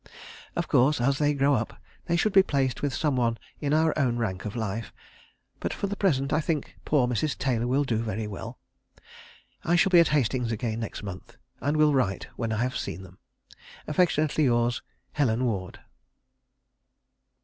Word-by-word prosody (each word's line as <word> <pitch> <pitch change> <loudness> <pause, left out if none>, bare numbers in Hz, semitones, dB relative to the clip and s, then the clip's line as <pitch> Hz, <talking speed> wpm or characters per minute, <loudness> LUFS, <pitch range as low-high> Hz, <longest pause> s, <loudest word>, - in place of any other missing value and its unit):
Of - - -1
course, 135 +4 +3
as 135 +3 +1
they 145 -1 +2
grow 140 +1 +3
up, 120 -3 -2 0.3
they 170 - +1
should 200 +4 +1
be 195 - +8
placed 135 -8 -1
with 145 - 0
some 145 +2 0
one 115 -2 +1 0.2
in 145 -1 -2
our 160 +1 +3
own 125 -5 +1
rank 95 -6 -3
of 105 - -5
life, 110 -2 -3 0.7
but - - -2
for - - -2
the 200 +1 -3
present 140 -10 +1
I 155 - +3
think 155 -3 -2
poor 140 -5 +3
Mrs. 125 +5 -1
Taylor 120 -3 0
will 135 +3 +2
do 120 -5 -1
very 110 -1 -2
well.... 105 -2 -7 1.1
I 175 - +2
shall 180 +2 +3
be 175 - +8
at 170 - +6
Hastings 125 -4 +1
again 115 0 -2
next 115 -2 -5
month, 95 -2 -8 0.2
and 145 +4 0
will 155 -1 +4
write 115 -8 0
when 115 -2 -2
I 110 +2 0
have 130 0 -2
seen 95 -1 -5
them.... 95 0 -15 0.7
"Affectionately 155 -2 +2
yours, 120 -1 +1 0.3
"HELEN 125 -4 +1
WARD." 95 -6 -3
130 Hz, 180 wpm, -27 LUFS, 115-150 Hz, 1.1 s, be